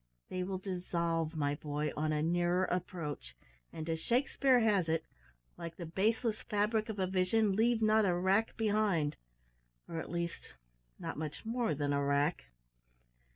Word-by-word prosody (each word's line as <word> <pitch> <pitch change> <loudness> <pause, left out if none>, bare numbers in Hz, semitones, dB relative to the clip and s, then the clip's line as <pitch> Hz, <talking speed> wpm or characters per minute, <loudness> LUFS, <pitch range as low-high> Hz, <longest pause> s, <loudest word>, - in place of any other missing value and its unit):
They 185 - -2
will 190 +1 -2
dissolve, 170 -3 -2
my 145 -2 +1
boy, 150 0 -2
on 155 +1 0
a 150 0 +1
nearer 175 +2 +2
approach, 175 -5 -4 0.4
and, 160 0 -6
as 165 -1 -1
Shakespeare 255 - +3
has 200 -7 +3
it, 160 0 0 0.5
`like 170 -1 -6
the 175 - -6
baseless 215 +6 +1
fabric 215 +1 0
of 215 - -4
a 190 - +1
vision, 190 +3 +2
leave 225 +1 +3
not 215 0 +5
a 180 -2 +2
wrack 190 +5 +2
behind,' 205 -9 +1 0.7
or, 165 - -4
at - - -6
least, 170 0 -4 0.4
not - - -5
much 155 +4 -5
more 230 -7 0
than 145 0 0
a 140 0 +1
wrack." 140 - +1
180 Hz, 155 wpm, -33 LUFS, 160-215 Hz, 0.7 s, not